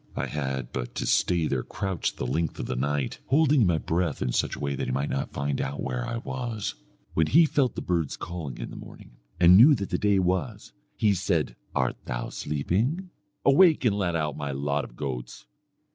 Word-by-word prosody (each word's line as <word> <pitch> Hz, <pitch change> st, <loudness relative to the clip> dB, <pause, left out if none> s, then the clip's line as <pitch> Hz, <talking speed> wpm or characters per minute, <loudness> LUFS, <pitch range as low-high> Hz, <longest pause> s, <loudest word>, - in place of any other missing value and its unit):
I -, -, -1 dB
had 65 Hz, -4 st, -3 dB
but -, -, -4 dB
to -, -, -2 dB
stay 85 Hz, -3 st, +2 dB
there 65 Hz, -4 st, 0 dB
crouched 95 Hz, +5 st, -3 dB
the -, -, -3 dB
length 80 Hz, +6 st, -1 dB
of -, -, -4 dB
the 65 Hz, -, -3 dB
night, 70 Hz, +1 st, -1 dB
holding 145 Hz, 0 st, +4 dB
in 105 Hz, -, +4 dB
my 85 Hz, -2 st, +2 dB
breath 80 Hz, -1 st, -1 dB
in 60 Hz, -, -1 dB
such -, -, 0 dB
a -, -, -10 dB
way 70 Hz, -1 st, -1 dB
that 70 Hz, -, -3 dB
he -, -, -1 dB
might 70 Hz, +3 st, -1 dB
not 70 Hz, -, -2 dB
find 70 Hz, 0 st, -2 dB
out 70 Hz, +2 st, -4 dB
where 60 Hz, -2 st, -3 dB
I 115 Hz, -, -3 dB
was. 120 Hz, -3 st, -4 dB, 0.4 s
"When 80 Hz, -1 st, +2 dB
he 165 Hz, +2 st, +6 dB
felt 135 Hz, -6 st, +1 dB
the -, -, -4 dB
birds 85 Hz, -5 st, -1 dB
calling 85 Hz, -7 st, -6 dB
in -, -, -6 dB
the -, -, -9 dB
morning, -, -, -12 dB, 0.2 s
and 90 Hz, 0 st, +8 dB
knew 140 Hz, +7 st, +8 dB
that 100 Hz, -5 st, -5 dB
the 90 Hz, -, 0 dB
day 105 Hz, -1 st, +3 dB
was, 90 Hz, -2 st, -1 dB, 0.2 s
he 105 Hz, -2 st, +3 dB
said 90 Hz, -9 st, 0 dB, 0.2 s
'Art 65 Hz, -2 st, 0 dB
thou -, -, -3 dB
sleeping? 115 Hz, -, -1 dB, 0.3 s
Awake 150 Hz, +1 st, +5 dB
and 105 Hz, -4 st, +3 dB
let 90 Hz, -4 st, 0 dB
out 75 Hz, -3 st, -1 dB
my 75 Hz, -1 st, -4 dB
lot 70 Hz, +1 st, -1 dB
of -, -, -11 dB
goats.' 65 Hz, -2 st, -5 dB
85 Hz, 215 wpm, -27 LUFS, 70-105 Hz, 0.4 s, and